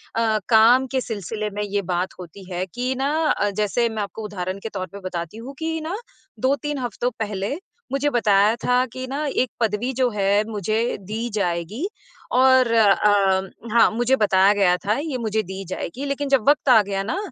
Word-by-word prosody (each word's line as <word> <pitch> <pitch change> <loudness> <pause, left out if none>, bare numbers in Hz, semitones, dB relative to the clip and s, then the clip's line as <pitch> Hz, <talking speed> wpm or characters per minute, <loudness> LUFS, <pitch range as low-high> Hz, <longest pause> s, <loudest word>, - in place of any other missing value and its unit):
अ, 220 -2 +2
काम 240 +4 +6
के 260 -1 0
सिलसिले 215 -1 -4
में 210 - -3
ये 205 0 -1
बात 180 +2 -1
होती 180 +2 -10
है 180 +1 -2
कि 250 +2 -1
ना 270 +2 0 0.2
अ, 205 - +1
जैसे 210 +4 0
मैं 220 -1 -3
आपको 220 +2 -7
उदाहरण 190 -1 -4
के 225 - -4
तौर 185 -3 -5
पर 200 - -7
बताती 170 +3 -5
हूँ 265 +4 -9
कि 320 0 -2
ना, 330 +5 -4 0.4
2-3 285 +3 0
हफ़्तों 245 0 -2
पहले 210 +5 -2 0.3
मुझे 275 +2 +1
बताया 210 -1 +4
था 250 +1 +3
कि 255 0 -5
ना, 285 +3 -3
एक 255 -3 0
पदवी 225 +3 0
जो 255 0 +1
है, 200 0 +2
मुझे 220 +3 -1
दी 220 +5 -4
जाएगी 200 - -2 0.5
और 260 -2 +5
अ, 200 -3 +3 0.2
हाँ, 235 - +5
मुझे 240 +4 +2
बताया 200 -3 +4
गया 190 -3 +3
था, 210 +6 -1
ये 290 -3 -3
मुझे 220 -2 -1
दी 190 +1 -7
जाएगी, 250 +9 -5
लेकिन 280 0 -2
जब 270 -2 +2
वक़्त 290 -2 +2
आ 225 -4 +8
गया 195 0 -2
ना, 320 - -2
220 Hz, 190 wpm, -22 LUFS, 200-255 Hz, 0.5 s, आ